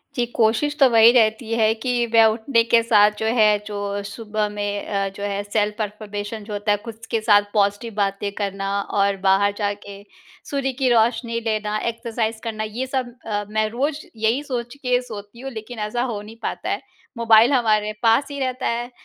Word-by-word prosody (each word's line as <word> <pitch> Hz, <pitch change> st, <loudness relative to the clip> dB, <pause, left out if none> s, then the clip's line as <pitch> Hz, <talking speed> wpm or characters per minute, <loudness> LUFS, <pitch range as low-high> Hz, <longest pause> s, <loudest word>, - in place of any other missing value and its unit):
जी, 245 Hz, -, +1 dB
कोशिश 235 Hz, +6 st, +2 dB
तो 275 Hz, -, +7 dB
वही 230 Hz, 0 st, +7 dB
रहती 225 Hz, -1 st, +2 dB
है 220 Hz, -1 st, +3 dB
कि 240 Hz, +1 st, 0 dB
मैं 225 Hz, -1 st, +7 dB
उठने 230 Hz, +1 st, +1 dB
के 230 Hz, 0 st, +4 dB
साथ, 210 Hz, -2 st, +5 dB
जो 220 Hz, -, -2 dB
है, 215 Hz, -2 st, +5 dB
जो 205 Hz, -1 st, -3 dB
सुबह 210 Hz, 0 st, -3 dB
में 205 Hz, 0 st, -3 dB
अ, 195 Hz, -1 st, -1 dB
जो 195 Hz, +1 st, -9 dB
है, 200 Hz, 0 st, -2 dB
सेल्फ़-अफ़र्मेशन 210 Hz, 0 st, -3 dB
जो 210 Hz, 0 st, -8 dB
होता 205 Hz, +1 st, -1 dB
है, 205 Hz, -, +3 dB
खुद 225 Hz, -1 st, -9 dB
के 225 Hz, -, +1 dB
साथ 210 Hz, -2 st, +5 dB
पॉज़िटिव 205 Hz, +2 st, 0 dB
बातें 200 Hz, 0 st, -1 dB
करना 195 Hz, -1 st, -3 dB, 0.3 s
और 200 Hz, 0 st, +2 dB
बाहर 195 Hz, +1 st, +3 dB
जाके 205 Hz, -1 st, -4 dB, 0.5 s
सूर्य 275 Hz, -1 st, -1 dB
की 260 Hz, -, +3 dB
रोशनी 230 Hz, 0 st, +2 dB
लेना, 215 Hz, -1 st, -1 dB
एक्सरसाइज़ 230 Hz, -1 st, -3 dB
करना, 215 Hz, -1 st, -3 dB
ये 225 Hz, +5 st, -4 dB
सब 255 Hz, -2 st, -3 dB
अ, 205 Hz, -2 st, -2 dB
मैं 215 Hz, 0 st, +1 dB
रोज़ 285 Hz, +6 st, -2 dB
यही 225 Hz, +6 st, 0 dB
सोच 245 Hz, -3 st, -4 dB
के 250 Hz, -3 st, 0 dB
सोती 215 Hz, -2 st, -10 dB
हूँ, 270 Hz, +1 st, -6 dB
लेकिन 225 Hz, 0 st, -8 dB
ऐसा 240 Hz, +3 st, -2 dB
हो 205 Hz, -2 st, -4 dB
नहीं 215 Hz, +2 st, -12 dB
पाता -, -, -3 dB
है। 205 Hz, -, -2 dB, 0.4 s
मोबाइल 230 Hz, +2 st, +5 dB
हमारे 215 Hz, -4 st, +2 dB
पास 230 Hz, +5 st, +4 dB
ही 280 Hz, -, -5 dB
रहता 255 Hz, -1 st, -2 dB
है, 240 Hz, +1 st, -2 dB
220 Hz, 190 wpm, -22 LUFS, 205-235 Hz, 0.5 s, तो